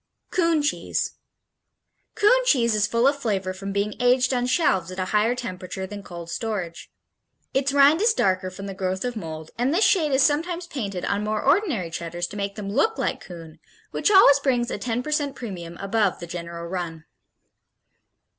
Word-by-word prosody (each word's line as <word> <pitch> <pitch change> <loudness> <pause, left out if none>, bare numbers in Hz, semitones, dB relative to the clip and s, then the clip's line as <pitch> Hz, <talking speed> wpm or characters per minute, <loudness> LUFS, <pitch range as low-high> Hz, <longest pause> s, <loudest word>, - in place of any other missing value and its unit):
Coon 335 -4 +2
Cheese 290 - -2 1.0
Coon 440 +4 +5
cheese 235 - +3
is 210 -1 +2
full 235 +1 +1
of 280 0 +1
flavor 195 -7 -1
from 195 +1 -6
being 200 +1 -1
aged 250 +1 +3
on 245 0 0
shelves 220 - +2
at 185 - -8
a 185 - -1
higher 215 +3 +3
temperature 190 -5 -5
than 205 +1 -8
cold 170 -3 -9
storage. 190 -4 -4 0.6
Its 275 +1 +1
rind 285 +4 +5
is 450 +2 +5
darker 185 - +1
from 195 +2 -9
the 195 - -5
growth 190 +2 -2
of 245 -1 -3
mold 160 -5 -7
and 250 +3 +2
this 370 +8 +3
shade 320 -7 +3
is 265 0 +4
sometimes 335 +5 0
painted 200 - -4
on 200 +1 -1
more 215 0 -1
ordinary 280 - +1
Cheddars 170 +1 -4
to - - -10
make 200 -1 -3
them 205 -2 -5
look 445 - +1
like - - -2
Coon, 165 -3 -11 0.3
which - - +1
always 380 -9 +7
brings 245 -4 0
a - - -3
10 240 +3 -2
percent 295 -2 -1
premium 175 -7 -7
above 200 -1 0
the 175 - -6
general 170 0 -6
run. 170 -3 -5
210 Hz, 185 wpm, -24 LUFS, 185-275 Hz, 1.0 s, always